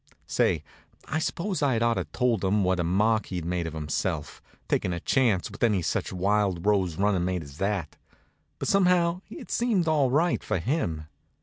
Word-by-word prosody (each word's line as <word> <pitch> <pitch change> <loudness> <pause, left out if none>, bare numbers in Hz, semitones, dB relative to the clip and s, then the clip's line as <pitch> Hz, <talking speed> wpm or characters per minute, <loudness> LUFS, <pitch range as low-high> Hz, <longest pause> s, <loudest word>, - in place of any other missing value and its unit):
Say, - - +1 0.4
I 155 - -1
s'pose 180 +3 -2
I'd 130 -5 +2
ought 115 0 +3
to 95 -6 -2
told 115 - 0
him 100 +2 +2
what 90 0 +1
a - - +1
mark 105 +5 +2
he'd 90 -3 -4
made 85 -1 -1
of 80 - -6
himself, 75 -2 -3 0.3
takin' 90 - 0
a 85 - -3
chance 110 -3 +1
with 100 - -12
any 105 -7 +2
such - - -1
wild 95 -1 0
rose 95 -6 +2
runnin' 100 -3 +2
mate 90 -1 -1
as 70 +1 -13
that; 95 -5 -2 0.6
but - - -4
somehow 180 -2 +3
it 290 - -9
seemed 220 -8 +1
all 150 -4 +3
right, 160 +7 +1
for - - -1
him. 85 - -2
105 Hz, 185 wpm, -27 LUFS, 90-140 Hz, 0.6 s, ought